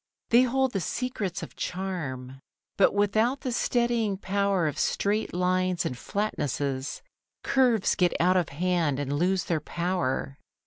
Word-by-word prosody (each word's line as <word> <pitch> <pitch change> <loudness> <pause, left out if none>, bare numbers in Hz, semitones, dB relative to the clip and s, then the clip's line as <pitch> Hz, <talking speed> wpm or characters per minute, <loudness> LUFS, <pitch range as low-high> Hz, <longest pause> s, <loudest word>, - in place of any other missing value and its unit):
They 235 +2 +7
hold 260 +1 +2
the 195 - 0
secrets 205 -4 -3
of - - -9
charm. 140 -9 -4 0.4
But 200 - +4
without 220 +6 +2
the 255 - -2
steadying 235 -4 +1
power 195 -3 +1
of 150 - -3
straight 210 +2 0
lines 180 0 +1
and 125 - -2
flatnesses, 140 - -2 0.4
curves 245 -6 +3
get 180 -1 +1
out 180 +2 +4
of 180 -2 +1
hand 165 -2 0
and 145 -1 -2
lose 180 +4 +1
their 165 -3 -1
power. 160 -5 -2
185 Hz, 140 wpm, -27 LUFS, 160-215 Hz, 0.4 s, They